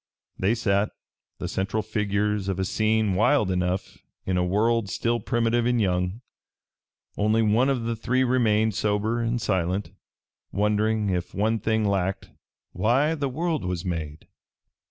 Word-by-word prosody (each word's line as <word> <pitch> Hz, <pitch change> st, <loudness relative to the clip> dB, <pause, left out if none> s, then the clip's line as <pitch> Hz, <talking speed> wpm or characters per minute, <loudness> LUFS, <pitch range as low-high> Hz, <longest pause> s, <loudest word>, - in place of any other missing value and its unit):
They 100 Hz, +5 st, +2 dB
sat, 100 Hz, -3 st, +1 dB, 0.5 s
the -, -, -4 dB
central 100 Hz, +3 st, -2 dB
figures 105 Hz, -1 st, -1 dB
of 95 Hz, -1 st, -1 dB
a 95 Hz, -, 0 dB
scene 110 Hz, 0 st, +1 dB
wild 100 Hz, 0 st, +3 dB
enough, 90 Hz, +1 st, -2 dB, 0.3 s
in 95 Hz, -, 0 dB
a 90 Hz, -, +2 dB
world 105 Hz, +3 st, +1 dB
still 120 Hz, +3 st, 0 dB
primitive 120 Hz, 0 st, +1 dB
and 125 Hz, -1 st, +2 dB
young. 90 Hz, +1 st, 0 dB, 1.0 s
Only 110 Hz, +2 st, +2 dB
one 110 Hz, +5 st, +3 dB
of 130 Hz, -4 st, 0 dB
the 115 Hz, 0 st, -1 dB
three 125 Hz, +3 st, +1 dB
remained 110 Hz, -4 st, +2 dB
sober 105 Hz, +3 st, 0 dB
and 115 Hz, +1 st, 0 dB
silent, 95 Hz, -1 st, -1 dB, 0.6 s
wondering, 105 Hz, 0 st, +1 dB
if 90 Hz, -1 st, -3 dB
one 110 Hz, +3 st, +1 dB
thing 110 Hz, +1 st, 0 dB
lacked, 95 Hz, -1 st, -1 dB, 0.4 s
why 125 Hz, -, +2 dB
the 140 Hz, -4 st, -2 dB
world 160 Hz, -, -1 dB
was 90 Hz, 0 st, -3 dB
made. 80 Hz, -4 st, -4 dB
105 Hz, 145 wpm, -25 LUFS, 95-115 Hz, 1.0 s, wild